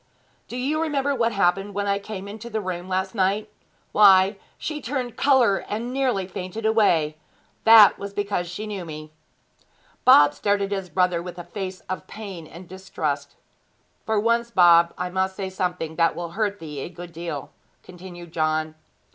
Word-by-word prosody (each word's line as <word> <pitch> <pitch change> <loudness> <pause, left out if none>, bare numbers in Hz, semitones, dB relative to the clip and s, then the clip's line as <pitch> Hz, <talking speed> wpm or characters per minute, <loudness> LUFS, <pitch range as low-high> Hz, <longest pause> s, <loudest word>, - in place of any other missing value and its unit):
Do 245 - -6
you 290 +5 -1
remember 285 -3 0
what 235 -3 +1
happened 195 0 0
when 205 0 -1
I 200 0 0
came 200 -1 -7
into 215 +3 -8
the 220 -1 -2
room 185 -2 -5
last 190 +1 -1
night? 205 +1 0 0.4
Why, 195 -1 +6 0.2
she 305 -1 -5
turned 250 -2 -3
colour 255 -9 +4
and 235 +4 -3
nearly 255 -8 0
fainted 190 +4 -6
away. 170 -9 +2 0.5
That 220 -3 +8
was 200 0 -6
because 200 -4 -2
she 195 +5 -6
knew 205 -3 -5
me.' 155 -2 -9 0.9
Bob 145 - +7
stared 200 +5 0
at 195 - -4
his 195 -2 -3
brother 180 0 +1
with 180 0 -8
a 175 - -6
face 185 +1 -6
of 185 - -6
pain 195 -7 -8
and 170 +3 -12
distrust. 155 -6 -4 0.7
'For 220 -1 0
once, 235 +2 +1
Bob, 170 -5 +5
I 180 0 -3
must 190 +1 -1
say 190 -1 -4
something 180 -4 -3
that 165 -1 +2
will 170 -1 -5
hurt 205 +1 -1
thee 150 -5 -8
a 135 - -5
good 175 0 -10
deal,' 165 -4 -6 0.3
continued 175 -2 -11
John. 155 0 -1
190 Hz, 170 wpm, -24 LUFS, 175-215 Hz, 0.9 s, That